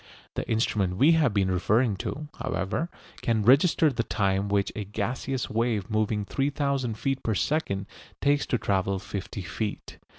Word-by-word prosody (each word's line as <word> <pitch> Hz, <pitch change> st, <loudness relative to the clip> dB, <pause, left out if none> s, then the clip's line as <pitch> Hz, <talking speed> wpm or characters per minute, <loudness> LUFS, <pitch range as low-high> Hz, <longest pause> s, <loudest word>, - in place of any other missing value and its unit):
The -, -, -4 dB
instrument 100 Hz, -5 st, +1 dB
we 145 Hz, +9 st, +6 dB
have 160 Hz, -6 st, +4 dB
been 100 Hz, -2 st, +1 dB
referring 105 Hz, +5 st, +2 dB
to, 150 Hz, +9 st, -4 dB
however, 100 Hz, -, -2 dB, 0.3 s
can 110 Hz, -3 st, +1 dB
register 145 Hz, -, +5 dB
the 115 Hz, -, 0 dB
time 100 Hz, -1 st, 0 dB
which 100 Hz, -1 st, +1 dB
a 105 Hz, -, -3 dB
gaseous 120 Hz, +6 st, -2 dB
wave 115 Hz, -2 st, -1 dB
moving 110 Hz, -1 st, 0 dB
3000 140 Hz, -2 st, -1 dB
feet 135 Hz, +3 st, -1 dB
per 110 Hz, -, -1 dB
second 100 Hz, -8 st, 0 dB, 0.3 s
takes 145 Hz, 0 st, +2 dB
to 125 Hz, -, +1 dB
travel 95 Hz, -2 st, 0 dB
fifty 100 Hz, 0 st, -5 dB
feet. 95 Hz, +5 st, -5 dB
110 Hz, 155 wpm, -27 LUFS, 100-135 Hz, 0.3 s, we